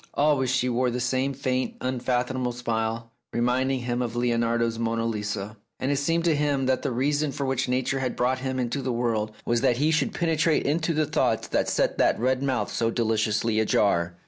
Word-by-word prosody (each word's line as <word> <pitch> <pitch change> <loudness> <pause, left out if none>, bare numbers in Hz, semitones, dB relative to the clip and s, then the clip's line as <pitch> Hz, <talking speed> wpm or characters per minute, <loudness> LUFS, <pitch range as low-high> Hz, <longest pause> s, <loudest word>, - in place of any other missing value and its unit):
Always 145 -3 +2
she 130 0 +1
wore 125 +1 +1
the 125 +1 -2
same 130 +2 0
faint, 130 -1 -2
unfathom 125 0 -1
able 125 -1 -1
smile, 115 -1 -2 0.2
reminding 125 +2 +1
him 120 0 -2
of 120 -1 -3
Leonardo's 115 -1 0
"Monna 115 0 -1
Lisa," 105 -1 -3 0.2
and 130 - 0
it 140 - +1
seemed 165 +4 +1
to 165 -3 +3
him 145 -2 +1
that 130 0 +1
the 140 - -1
reason 145 +4 0
for 140 - -3
which 130 -1 -1
Nature 130 +2 0
had 130 -2 -2
brought 130 +1 +1
him 130 0 -3
into 125 +2 -1
the 130 -1 -2
world 115 -3 -1
was 120 -1 +1
that 120 - +2
he 150 +4 +2
should 160 - +1
penetrate 165 -2 +1
into 160 +3 0
the 155 0 +2
thoughts 150 - 0
that - - +1
set - - 0
that - - +3
red 130 +2 +1
mouth 135 -2 -1
so 115 - +1
deliciously 110 -1 +1
ajar. 85 -5 +2
125 Hz, 200 wpm, -26 LUFS, 115-135 Hz, 0.2 s, to